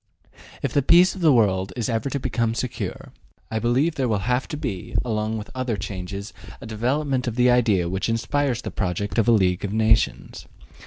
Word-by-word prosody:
If -, -, -1 dB
the 145 Hz, -, +3 dB
peace 175 Hz, +6 st, +5 dB
of 190 Hz, -, -9 dB
the 160 Hz, -3 st, +5 dB
world 95 Hz, -6 st, +2 dB
is 120 Hz, -, -2 dB
ever 115 Hz, +3 st, -1 dB
to 140 Hz, -, -2 dB
become 115 Hz, -3 st, -1 dB
secure, 120 Hz, +1 st, -4 dB, 0.4 s
I 110 Hz, -, -1 dB
believe 130 Hz, +8 st, +1 dB
there 135 Hz, -4 st, -1 dB
will 110 Hz, -3 st, +1 dB
have 125 Hz, +1 st, 0 dB
to 150 Hz, -, -5 dB
be, 115 Hz, -, -5 dB
along 110 Hz, -1 st, -1 dB
with 105 Hz, -, -8 dB
other 130 Hz, -4 st, -2 dB
changes, 100 Hz, +1 st, -6 dB, 0.3 s
a -, -, -10 dB
development 130 Hz, +4 st, -1 dB
of 115 Hz, -, -2 dB
the 125 Hz, 0 st, +4 dB
idea 110 Hz, -8 st, +3 dB
which 95 Hz, +5 st, -2 dB
inspires 120 Hz, +2 st, 0 dB
the -, -, -5 dB
project 100 Hz, +3 st, -2 dB
of 115 Hz, -, +2 dB
a -, -, +6 dB
League 95 Hz, -5 st, +2 dB
of 100 Hz, 0 st, -3 dB
Nations. 110 Hz, 0 st, +1 dB
115 Hz, 200 wpm, -23 LUFS, 105-130 Hz, 0.4 s, a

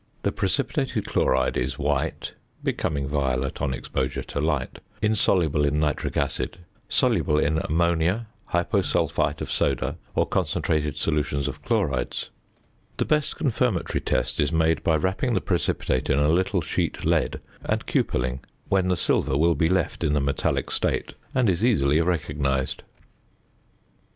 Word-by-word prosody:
The -, -, +1 dB
precipitated -, -, -1 dB
chloride 65 Hz, -1 st, +1 dB
is 65 Hz, +2 st, -1 dB
white 75 Hz, -2 st, -1 dB, 0.3 s
(becoming 70 Hz, -2 st, -1 dB
violet 70 Hz, -2 st, -1 dB
on 70 Hz, -, 0 dB
exposure 65 Hz, 0 st, -2 dB
to -, -, -5 dB
light), 75 Hz, -3 st, -1 dB, 0.2 s
insoluble 90 Hz, -8 st, +2 dB
in 75 Hz, +1 st, +1 dB
nitric 75 Hz, -1 st, -1 dB
acid, 70 Hz, +4 st, -1 dB, 0.3 s
soluble 75 Hz, -, +2 dB
in 80 Hz, +1 st, +2 dB
ammonia, 85 Hz, +6 st, +1 dB, 0.3 s
hyposulphite 85 Hz, 0 st, +1 dB
of -, -, -4 dB
soda, 70 Hz, +6 st, 0 dB, 0.2 s
or -, -, +3 dB
concentrated 75 Hz, -2 st, 0 dB
solutions 75 Hz, -2 st, 0 dB
of 70 Hz, 0 st, -6 dB
chlorides. 85 Hz, -, -1 dB, 0.7 s
The -, -, +1 dB
best 150 Hz, -2 st, +1 dB
confirmatory 135 Hz, -8 st, 0 dB
test -, -, 0 dB
is 75 Hz, -, +2 dB
made 80 Hz, -1 st, +2 dB
by 80 Hz, -, +3 dB
wrapping 95 Hz, -, 0 dB
the -, -, +3 dB
precipitate 85 Hz, -7 st, -1 dB
in 70 Hz, -, +3 dB
a 75 Hz, +1 st, +3 dB
little 95 Hz, +3 st, +2 dB
sheet -, -, -2 dB
lead, -, -, +1 dB, 0.2 s
and -, -, -1 dB
cupelling, 65 Hz, +1 st, 0 dB, 0.3 s
when 95 Hz, -2 st, +2 dB
the 90 Hz, -1 st, +1 dB
silver 70 Hz, -, +1 dB
will 85 Hz, +3 st, +4 dB
be 80 Hz, -1 st, +1 dB
left 90 Hz, -3 st, 0 dB
in 75 Hz, -2 st, +2 dB
the 75 Hz, -, +3 dB
metallic 70 Hz, 0 st, 0 dB
state, -, -, -1 dB, 0.2 s
and 125 Hz, -3 st, +3 dB
is 95 Hz, +1 st, +1 dB
easily 80 Hz, -, +3 dB
recognized. 75 Hz, -6 st, -1 dB
75 Hz, 140 wpm, -25 LUFS, 70-85 Hz, 0.7 s, will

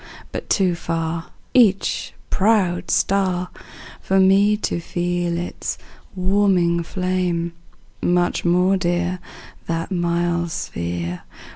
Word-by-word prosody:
But -, -, -6 dB
too 185 Hz, -3 st, +3 dB
far 165 Hz, 0 st, -3 dB, 0.3 s
Each 210 Hz, -6 st, +3 dB, 0.2 s
proud 195 Hz, -4 st, +2 dB
star, 185 Hz, -2 st, +1 dB, 0.5 s
For 190 Hz, 0 st, +2 dB
me 200 Hz, +2 st, +5 dB
to 205 Hz, -, -2 dB
feel 175 Hz, 0 st, -1 dB
its 175 Hz, -, -4 dB, 0.4 s
warming 185 Hz, -2 st, +2 dB
flame; 180 Hz, -1 st, -1 dB, 0.5 s
Much 175 Hz, 0 st, +1 dB
more 180 Hz, +2 st, +3 dB
dear 175 Hz, 0 st, 0 dB, 0.5 s
That 165 Hz, +2 st, -2 dB
mild 170 Hz, -1 st, 0 dB
sphere. 85 Hz, -, -4 dB
175 Hz, 100 wpm, -21 LUFS, 170-190 Hz, 0.5 s, me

